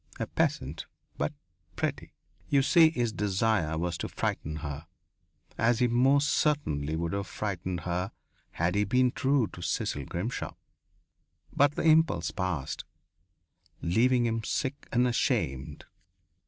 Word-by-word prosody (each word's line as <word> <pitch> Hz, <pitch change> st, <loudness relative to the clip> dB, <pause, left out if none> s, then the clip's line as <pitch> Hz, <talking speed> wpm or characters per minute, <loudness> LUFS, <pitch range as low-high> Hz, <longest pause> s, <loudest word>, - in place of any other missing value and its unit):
A -, -, 0 dB
peasant, 70 Hz, +5 st, -1 dB, 0.3 s
but -, -, -1 dB, 0.4 s
pretty.... -, -, -3 dB, 0.4 s
You 140 Hz, -1 st, +4 dB
see, 160 Hz, +3 st, +6 dB
his 120 Hz, -8 st, -1 dB
desire 100 Hz, -6 st, +1 dB
was 85 Hz, 0 st, -2 dB
to -, -, -3 dB
frighten 75 Hz, +1 st, -2 dB
her, 70 Hz, +2 st, -6 dB, 0.7 s
as 115 Hz, +1 st, +3 dB
he 125 Hz, -, +3 dB
most 135 Hz, +4 st, +4 dB
certainly 80 Hz, -, +1 dB
would 85 Hz, +1 st, -2 dB
have 100 Hz, -1 st, -2 dB
frightened 95 Hz, -3 st, -3 dB
her 90 Hz, +2 st, -2 dB, 0.4 s
had 85 Hz, +2 st, 0 dB
he 100 Hz, +1 st, +2 dB
been 125 Hz, +5 st, +3 dB
true 135 Hz, -1 st, +2 dB
to 85 Hz, -, -9 dB
Cecil -, -, -2 dB
Grimshaw. 95 Hz, +8 st, -4 dB, 1.0 s
But 145 Hz, +1 st, +4 dB
the -, -, -2 dB
impulse 155 Hz, -, +4 dB
passed, 90 Hz, -8 st, -3 dB, 1.0 s
leaving 120 Hz, +7 st, +3 dB
him 115 Hz, -1 st, -1 dB
sick 140 Hz, +4 st, -2 dB
and 125 Hz, +1 st, +3 dB
ashamed. 70 Hz, -, -1 dB
110 Hz, 130 wpm, -29 LUFS, 85-130 Hz, 1.0 s, see